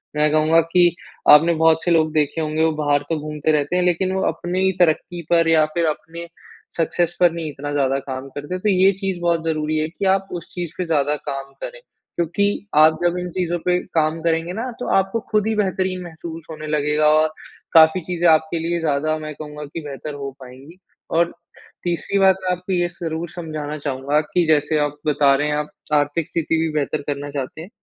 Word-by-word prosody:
मैं 150 Hz, 0 st, +2 dB
कहूँगा 155 Hz, +2 st, +4 dB
कि 175 Hz, -1 st, +5 dB, 0.3 s
आपने 160 Hz, +3 st, +7 dB
बहुत 160 Hz, 0 st, +3 dB
से 175 Hz, -, +1 dB
लोग 155 Hz, -2 st, +3 dB
देखे 155 Hz, +1 st, 0 dB
होंगे 155 Hz, 0 st, 0 dB
वो 160 Hz, -, +3 dB
बाहर 145 Hz, 0 st, +2 dB
तो 160 Hz, -, 0 dB
घूमते 150 Hz, 0 st, -2 dB
रहते 150 Hz, +2 st, 0 dB
हैं 180 Hz, -, +2 dB
लेकिन 180 Hz, +1 st, +1 dB
वो 190 Hz, -, -1 dB
अपनी 185 Hz, +3 st, 0 dB
तरक्की 175 Hz, 0 st, +1 dB
पर 165 Hz, -1 st, +4 dB
या 155 Hz, -1 st, +5 dB
फिर 170 Hz, -1 st, +2 dB
अपने 170 Hz, +2 st, -4 dB, 0.5 s
सक्सेस 170 Hz, +1 st, 0 dB
पर 175 Hz, -1 st, +5 dB
नहीं 165 Hz, -2 st, -4 dB
इतना 145 Hz, 0 st, -6 dB
ज़्यादा 135 Hz, -1 st, +1 dB
काम 130 Hz, 0 st, -6 dB
करते 145 Hz, +5 st, -7 dB
हैं, 185 Hz, -, -5 dB
तो 210 Hz, -, +1 dB
ये 190 Hz, 0 st, +5 dB
चीज़ 190 Hz, -2 st, -3 dB
बहुत 170 Hz, -1 st, +1 dB
ज़रूरी 155 Hz, -1 st, -1 dB
है 155 Hz, 0 st, 0 dB
कि, 195 Hz, +4 st, -5 dB
आप 195 Hz, 0 st, +2 dB
उस 175 Hz, -, -6 dB
चीज़ 175 Hz, -3 st, -4 dB
पे 180 Hz, -, -2 dB
ज़्यादा 150 Hz, -2 st, +1 dB
काम 135 Hz, 0 st, -5 dB
करें। -, -, -7 dB, 0.4 s
क्योंकि 175 Hz, +4 st, +1 dB, 0.3 s
आप 155 Hz, +1 st, +5 dB
जब 175 Hz, 0 st, +1 dB
इन 180 Hz, 0 st, -4 dB
चीज़ 180 Hz, -1 st, -2 dB
पे 180 Hz, 0 st, +3 dB, 0.2 s
काम 160 Hz, 0 st, +1 dB
करेंगे 165 Hz, +1 st, 0 dB
ना, 230 Hz, +6 st, -3 dB
तो -, -, -4 dB
आपको 195 Hz, +4 st, 0 dB
खुद 215 Hz, -1 st, +2 dB
ही 220 Hz, -, 0 dB
बेहतरीन 190 Hz, -2 st, -1 dB
महसूस 165 Hz, -1 st, -9 dB
होने 155 Hz, -1 st, -7 dB
लगेगा 150 Hz, 0 st, +1 dB
और 155 Hz, 0 st, +4 dB, 0.5 s
काफ़ी 160 Hz, +2 st, +6 dB
चीज़े 175 Hz, +1 st, 0 dB
आपके 160 Hz, +1 st, +3 dB
लिए 170 Hz, +1 st, -1 dB
ज़्यादा 155 Hz, 0 st, 0 dB
मैं 155 Hz, 0 st, -6 dB
कहूँगा 150 Hz, -1 st, -8 dB
कि 145 Hz, +3 st, -7 dB
बेहतर 145 Hz, +2 st, -6 dB
हो 140 Hz, -1 st, -5 dB
पाएंँगी 135 Hz, +6 st, -13 dB, 0.3 s
और, 170 Hz, +1 st, +2 dB, 0.5 s
तीसरी 175 Hz, +3 st, -1 dB
बात 190 Hz, -1 st, +5 dB
आपको 180 Hz, +1 st, -3 dB
ये 175 Hz, -1 st, +1 dB
ज़रूर 165 Hz, 0 st, -3 dB
समझाना 155 Hz, -3 st, -5 dB
चाहूँगा 140 Hz, 0 st, -1 dB
कि 175 Hz, +3 st, 0 dB
जैसे 155 Hz, 0 st, +2 dB
आप 145 Hz, 0 st, -1 dB
बता 145 Hz, -2 st, +4 dB
रहे 145 Hz, +2 st, 0 dB
हैं, 150 Hz, -, 0 dB
आप 150 Hz, 0 st, -2 dB, 0.3 s
आर्थिक 145 Hz, +2 st, +1 dB
स्थिति 165 Hz, -1 st, -1 dB
भी 165 Hz, -, 0 dB
बेहतर 145 Hz, +1 st, -2 dB
करना 145 Hz, 0 st, -3 dB
चाहते 140 Hz, +2 st, -5 dB
हैं, 175 Hz, -, -10 dB
160 Hz, 205 wpm, -21 LUFS, 150-175 Hz, 0.5 s, आपने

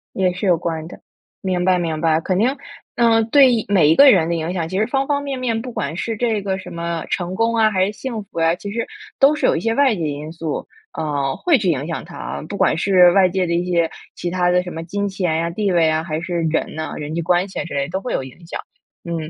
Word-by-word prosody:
也 185 Hz, -1 st, +2 dB
是 185 Hz, +3 st, -4 dB
有 180 Hz, -2 st, +4 dB
关 160 Hz, -1 st, -3 dB
的。 -, -, -12 dB, 0.4 s
明 185 Hz, -2 st, -1 dB
白， 185 Hz, -1 st, +3 dB
明 165 Hz, -3 st, -2 dB
白。 160 Hz, -1 st, +3 dB
肯 185 Hz, +3 st, -1 dB
定， 245 Hz, +6 st, +2 dB, 0.4 s
嗯， 225 Hz, -1 st, +4 dB
对 255 Hz, -5 st, +5 dB
每 185 Hz, -7 st, +4 dB
一 160 Hz, -, +5 dB
个 280 Hz, -1 st, +9 dB
人 170 Hz, -7 st, +3 dB
的 170 Hz, -, 0 dB
影 165 Hz, +1 st, -2 dB
响， 170 Hz, -3 st, -2 dB
其 185 Hz, +2 st, -2 dB
实 215 Hz, -, +2 dB
方 270 Hz, +2 st, 0 dB
方 285 Hz, 0 st, 0 dB
面 275 Hz, -2 st, -4 dB
面。 235 Hz, -3 st, -1 dB
不 250 Hz, 0 st, -7 dB
管 165 Hz, -, -3 dB
是 225 Hz, +5 st, -2 dB
这 220 Hz, -2 st, 0 dB
个 190 Hz, -1 st, -2 dB
什 190 Hz, -, -10 dB
么 170 Hz, -1 st, -3 dB
成 180 Hz, 0 st, -2 dB
功 230 Hz, +3 st, +1 dB
啊， 220 Hz, -1 st, +4 dB
还 190 Hz, -2 st, +2 dB
是 205 Hz, -, -3 dB
幸 230 Hz, -1 st, -5 dB
福 175 Hz, -, -6 dB
呀， 165 Hz, 0 st, +3 dB
其 200 Hz, +3 st, -7 dB
实 230 Hz, +2 st, -3 dB, 0.3 s
都 280 Hz, +2 st, +5 dB
是 300 Hz, -, +1 dB
有 -, -, +3 dB
一 -, -, -2 dB
些 225 Hz, +5 st, 0 dB
外 275 Hz, -2 st, +3 dB
界 170 Hz, -, -4 dB
因 150 Hz, +1 st, -5 dB
素， 165 Hz, -3 st, -4 dB, 0.3 s
呃， 145 Hz, -4 st, -1 dB
会 345 Hz, -4 st, +3 dB
去 200 Hz, -7 st, +1 dB
影 145 Hz, -2 st, -1 dB
响 165 Hz, -1 st, -4 dB
他。 70 Hz, +4 st, -7 dB
不 -, -, -6 dB
管 -, -, +3 dB
是 180 Hz, 0 st, +5 dB
外 190 Hz, 0 st, +5 dB
界 185 Hz, 0 st, -1 dB
的 170 Hz, -, -1 dB
一 175 Hz, +1 st, 0 dB
些 170 Hz, -2 st, +2 dB, 0.2 s
其 175 Hz, -, -4 dB
他 180 Hz, 0 st, +1 dB
的 180 Hz, 0 st, +3 dB
什 180 Hz, -, -7 dB
么 165 Hz, -, -6 dB
金 200 Hz, +4 st, -2 dB
钱 185 Hz, -4 st, -1 dB
呀、 165 Hz, +1 st, 0 dB
地 195 Hz, +3 st, -1 dB
位 170 Hz, -2 st, +3 dB
啊， 155 Hz, 0 st, 0 dB
还 155 Hz, -2 st, -3 dB
是 170 Hz, 0 st, -2 dB
人 160 Hz, 0 st, -1 dB
呐、 155 Hz, 0 st, -4 dB
人 150 Hz, +1 st, -5 dB
际 170 Hz, -, -1 dB
关 180 Hz, +3 st, +1 dB
系 190 Hz, -, -7 dB
啊 -, -, -2 dB
之 175 Hz, -, -8 dB
类 140 Hz, -1 st, 0 dB
的 140 Hz, -, -8 dB
都 190 Hz, +2 st, -2 dB
会 250 Hz, -, -4 dB
有 -, -, -1 dB
影 130 Hz, +6 st, -12 dB
响。 -, -, -5 dB, 0.4 s
嗯， 170 Hz, -1 st, -3 dB
180 Hz, 295 characters per minute, -20 LUFS, 165-215 Hz, 0.4 s, 个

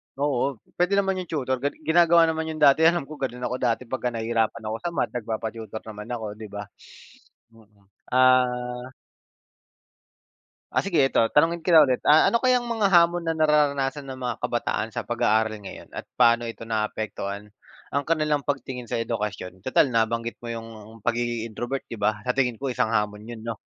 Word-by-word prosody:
oo, 140 Hz, -1 st, 0 dB, 0.2 s
puwede 180 Hz, +2 st, +2 dB
naman 195 Hz, -1 st, +1 dB
'yong 180 Hz, -, -6 dB
tutor, 130 Hz, -4 st, -1 dB
gan 140 Hz, +3 st, -1 dB
ginagawa 170 Hz, +1 st, +5 dB
naman 160 Hz, 0 st, -2 dB
'yon 155 Hz, -1 st, -5 dB
dati. 145 Hz, +2 st, +6 dB
Alam 170 Hz, -1 st, +2 dB
ko, 150 Hz, +2 st, -11 dB
gano'n 125 Hz, -2 st, -4 dB
ako 125 Hz, 0 st, -1 dB
dati 120 Hz, 0 st, 0 dB
pagka 130 Hz, -1 st, -2 dB
nahirapan 115 Hz, -1 st, -1 dB
ako 110 Hz, -, -2 dB
sa 170 Hz, +5 st, -4 dB
math, -, -, 0 dB
nagpapa-tutor 110 Hz, -2 st, -5 dB
naman 105 Hz, 0 st, -9 dB
ako, 115 Hz, -2 st, -4 dB
'di 110 Hz, -1 st, -8 dB
ba? 105 Hz, 0 st, -6 dB, 0.9 s
Mm, 105 Hz, -3 st, -22 dB, 0.3 s
ah 125 Hz, -1 st, +2 dB, 1.8 s
Ah, -, -, +1 dB
sige 195 Hz, -4 st, 0 dB
eto, 125 Hz, -, +2 dB
tanungin 165 Hz, +2 st, +2 dB
kita 165 Hz, -1 st, +7 dB
ulit, 130 Hz, -4 st, +3 dB
ah, 150 Hz, +2 st, +6 dB
ano 235 Hz, -, +1 dB
kayang 250 Hz, -1 st, +3 dB
mga 220 Hz, -4 st, +1 dB
hamon 175 Hz, -1 st, +4 dB
na 165 Hz, -, 0 dB
nararanasan 150 Hz, -3 st, +1 dB
ng 130 Hz, -1 st, -8 dB
mga 125 Hz, -2 st, -2 dB
kabataan -, -, -1 dB
sa -, -, -5 dB
pag-aaral 110 Hz, +1 st, +1 dB
ngayon, 95 Hz, -, -9 dB
at -, -, -5 dB, 0.2 s
paano 115 Hz, 0 st, +5 dB
ito 115 Hz, -1 st, -7 dB
naapektuhan, 105 Hz, -2 st, -3 dB, 0.4 s
ang 140 Hz, +1 st, -1 dB
kanilang 150 Hz, -2 st, 0 dB
pagtingin 135 Hz, -3 st, -3 dB
sa 115 Hz, -, -3 dB
edukasyon? 105 Hz, -5 st, -4 dB
Tutal 130 Hz, +3 st, +3 dB
nabanggit 115 Hz, -1 st, 0 dB
mo 120 Hz, -, -4 dB
'yong 115 Hz, -1 st, -9 dB
pagiging 120 Hz, 0 st, -1 dB
introvert, 120 Hz, +4 st, -5 dB
'di -, -, -6 dB
ba? 105 Hz, 0 st, 0 dB
Sa 125 Hz, -, +1 dB
tingin 125 Hz, -4 st, 0 dB
ko 135 Hz, -, -3 dB
isang 120 Hz, -3 st, 0 dB
hamon 105 Hz, -1 st, -1 dB
'yon, 115 Hz, 0 st, -9 dB
'no? 115 Hz, -2 st, -3 dB
125 Hz, 175 wpm, -25 LUFS, 115-150 Hz, 1.8 s, kita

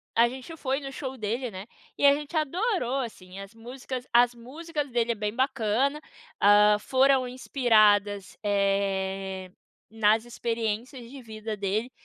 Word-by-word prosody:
a 235 Hz, +1 st, +5 dB
gente 265 Hz, +6 st, -9 dB
foi 270 Hz, 0 st, -1 dB
no 275 Hz, -1 st, -7 dB
show 265 Hz, -1 st, -6 dB
dele, 230 Hz, +3 st, -3 dB
né, 190 Hz, +3 st, -8 dB, 0.3 s
e -, -, +2 dB
a 280 Hz, -, +8 dB
gente 295 Hz, +3 st, -7 dB
adorou, 310 Hz, -, 0 dB
assim, 190 Hz, -5 st, -8 dB
as 195 Hz, +2 st, -10 dB
músicas 250 Hz, +2 st, -7 dB
as 240 Hz, 0 st, +5 dB
músicas 290 Hz, +5 st, -6 dB
dele 235 Hz, -1 st, 0 dB
é 235 Hz, -, -2 dB
bem 210 Hz, 0 st, -3 dB
bacana, 260 Hz, +3 st, 0 dB, 0.4 s
hã, 210 Hz, +1 st, +6 dB
foram 260 Hz, +2 st, +3 dB
inspiradas, 215 Hz, -6 st, +2 dB
eh, 195 Hz, -2 st, -1 dB, 0.4 s
nas 220 Hz, +1 st, +2 dB
experiências 235 Hz, +1 st, -4 dB
de 270 Hz, -1 st, -10 dB
vida 220 Hz, -1 st, -6 dB
dele, 210 Hz, +5 st, -2 dB
235 Hz, 145 wpm, -27 LUFS, 210-265 Hz, 0.4 s, a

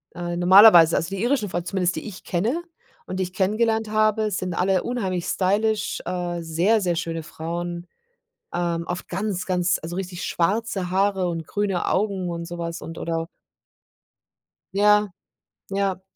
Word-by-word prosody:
äh 175 Hz, 0 st, -4 dB
normalerweise, 175 Hz, -2 st, +8 dB
also 165 Hz, -, 0 dB
die 195 Hz, -, -4 dB
irischen 240 Hz, -5 st, +1 dB
Frauen 175 Hz, 0 st, -3 dB
zumindest, 185 Hz, -2 st, 0 dB
die -, -, -5 dB
ich 200 Hz, -2 st, -9 dB
kenne 220 Hz, -, -1 dB, 0.4 s
und 185 Hz, -, -5 dB
die 190 Hz, -, 0 dB
ich 180 Hz, 0 st, -6 dB
kennengelernt 220 Hz, +3 st, +1 dB
habe, 215 Hz, 0 st, +2 dB
sind 185 Hz, -2 st, -2 dB
alle 185 Hz, +1 st, +1 dB
unheimlich 190 Hz, -8 st, -2 dB
stylisch, 210 Hz, +4 st, 0 dB
äh, 175 Hz, -1 st, -3 dB
sehr, 175 Hz, +7 st, +2 dB
sehr 175 Hz, -2 st, 0 dB
schöne 165 Hz, -1 st, -3 dB
Frauen, 170 Hz, +2 st, -5 dB, 0.7 s
ähm 170 Hz, -1 st, -1 dB
oft 175 Hz, 0 st, -4 dB
ganz, 190 Hz, 0 st, -2 dB
ganz 180 Hz, -1 st, +1 dB
also 165 Hz, +2 st, -6 dB
richtig 180 Hz, -2 st, -5 dB
schwarze 195 Hz, +1 st, -1 dB
Haare 190 Hz, 0 st, +1 dB
und 165 Hz, -2 st, -3 dB
grüne 205 Hz, -3 st, -1 dB
Augen 195 Hz, -2 st, 0 dB
und 170 Hz, 0 st, -4 dB
so 175 Hz, +1 st, -7 dB
was 170 Hz, 0 st, -4 dB
und 165 Hz, -, -8 dB
oder 165 Hz, 0 st, -2 dB, 1.5 s
Ja, 210 Hz, 0 st, +4 dB, 0.6 s
ja. 195 Hz, -1 st, -1 dB
185 Hz, 155 wpm, -23 LUFS, 175-205 Hz, 1.5 s, normalerweise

